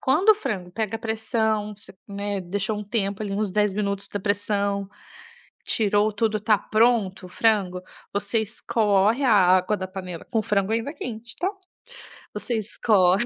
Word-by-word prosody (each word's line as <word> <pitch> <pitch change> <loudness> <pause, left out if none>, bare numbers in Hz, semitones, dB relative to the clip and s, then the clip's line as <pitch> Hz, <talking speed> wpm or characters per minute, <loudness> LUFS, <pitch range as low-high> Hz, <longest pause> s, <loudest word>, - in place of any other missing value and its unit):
Quando 315 +11 +4
o - - +8
frango 195 - -4
pega 220 +3 -3
pressão, 220 -1 -1
você, 205 - -14
né, 200 0 -3
deixou 200 +4 -2
um 210 - -5
tempo 200 -1 -1
ali, 205 -2 -3
uns 205 0 -1
10 210 +1 +2
minutos 200 0 -1
da 205 - -4
pressão, 200 0 0 0.8
tirou 210 0 +2
tudo, 215 0 0
tá 215 +1 +3
pronto 215 -4 +1
o - - -15
frango, 190 -3 +1 0.3
você 205 +3 0
escorre 220 +1 +1
a 255 - +4
água 185 0 +4
da 185 - -4
panela, 185 -3 -7
com 225 - +2
o - - +1
frango 200 -1 0
ainda 230 +6 -1
quente, 235 -5 -7
tá? 365 - 0 0.8
Você 240 - -3
escorre, 205 -2 +2
210 Hz, 165 wpm, -24 LUFS, 195-225 Hz, 0.8 s, o